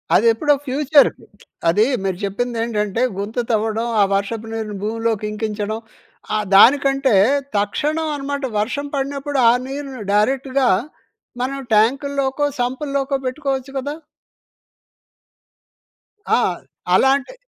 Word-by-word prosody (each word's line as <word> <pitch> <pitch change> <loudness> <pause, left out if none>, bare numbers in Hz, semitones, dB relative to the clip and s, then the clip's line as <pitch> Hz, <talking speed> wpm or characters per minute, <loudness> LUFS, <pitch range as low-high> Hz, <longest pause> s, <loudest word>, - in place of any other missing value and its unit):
అదెప్పుడో 230 +7 +4
future. 285 +2 +4 0.6
అదీ 210 +6 +4 0.2
మీరు 190 -2 -1
చెప్పిందేంటంటే, 225 0 -2 0.2
గుంత 205 +4 -5
తవ్వడం, 220 +1 0
ఆ - - +7
వర్షపు 215 +3 -3
నీరుని 215 -2 -4
భూమిలోకి 225 0 -1
ఇంకించడం, 215 0 -3 0.6
ఆహ్, 215 -1 0
దానికంటే, 270 +2 +5 0.4
తక్షణం 300 +11 -1
అన్నమాట, 285 0 -4 0.2
వర్షం 270 +7 -2
పడినప్పుడు 275 +1 -2
ఆ - - +7 0.2
నీరుని 270 -2 -6
డైరెక్ట్‌గా 260 +4 +2 0.7
మనం 275 +2 -2
ట్యాంకుల్లోకో, 275 +5 +1 0.2
సంపుల్లోకో 275 +2 -1
పెట్టుకోవచ్చు 270 0 -3
కదా! 285 +3 -4 2.4
ఆ! - - +2 0.6
అలాంటి, 270 - +2
255 Hz, 95 wpm, -20 LUFS, 215-275 Hz, 2.4 s, ఆ